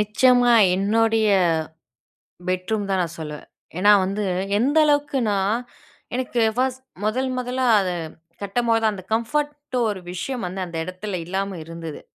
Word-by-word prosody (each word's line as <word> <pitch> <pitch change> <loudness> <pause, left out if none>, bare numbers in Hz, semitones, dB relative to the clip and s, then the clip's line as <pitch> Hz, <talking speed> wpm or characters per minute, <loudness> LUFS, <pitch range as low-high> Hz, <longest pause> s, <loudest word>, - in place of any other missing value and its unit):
நிச்சயமா. 245 +3 +4 0.2
என்னுடைய 220 +2 +2 1.2
பெட்ரூம் 195 +3 -1
தான் 190 - +1
நான் 170 0 -5
சொல்லுவேன். 150 -1 -7 0.3
ஏன்னா 205 +3 +6
வந்து 200 +2 -2 0.3
எந்த 280 +7 +2
அளவுக்குனா, 275 -8 +1 0.8
எனக்கு 250 -1 -1 0.2
1டு 260 0 -1 0.2
முதல் 255 +5 0
முதலா 250 +1 -1
அது 185 -2 -1 0.5
கட்டம்போது 225 +3 +1
தான் 215 -1 +2
அந்த 185 -2 -9
கம்ஃபோர்ட்டோ 290 +3 -2
ஒரு 200 -2 -5
விஷயம் 240 +6 -4
வந்து 190 +2 -6
அந்த 170 -1 -8
இடத்துல 185 +3 -5
இல்லாம 195 +1 -3
இருந்தது. 165 -2 -7
215 Hz, 130 wpm, -23 LUFS, 190-250 Hz, 1.2 s, ஏன்னா